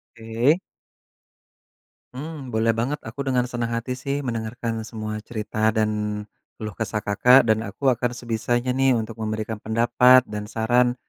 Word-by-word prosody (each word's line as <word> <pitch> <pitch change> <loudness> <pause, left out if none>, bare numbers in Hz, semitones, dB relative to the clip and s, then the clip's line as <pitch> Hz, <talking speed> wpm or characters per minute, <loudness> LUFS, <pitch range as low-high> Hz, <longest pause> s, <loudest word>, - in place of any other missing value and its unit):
Oke. 115 +8 +1 1.6
Mmm, 150 0 -6
boleh 115 +1 +3
banget 120 +6 -2
aku 110 +5 -10
dengan 125 -2 +2
senang 120 -1 -2
hati 115 +2 -3
sih 140 +3 -3
mendengarkan 115 -1 -3
semua 110 -1 -5
cerita 110 0 -1
dan 105 -1 -1 0.3
keluh 110 -1 -6
kesah 105 +1 -3
Kakak 125 +6 +5
dan 110 -1 +2
aku 130 +7 +1
akan 120 0 0
sebisanya 120 +1 -1
nih 135 0 +3
untuk 115 0 -4
memberikan 110 0 -3
pendapat 120 +3 +5
dan 105 -3 -6
saran 120 +3 +2
115 Hz, 140 wpm, -24 LUFS, 110-125 Hz, 1.6 s, Kakak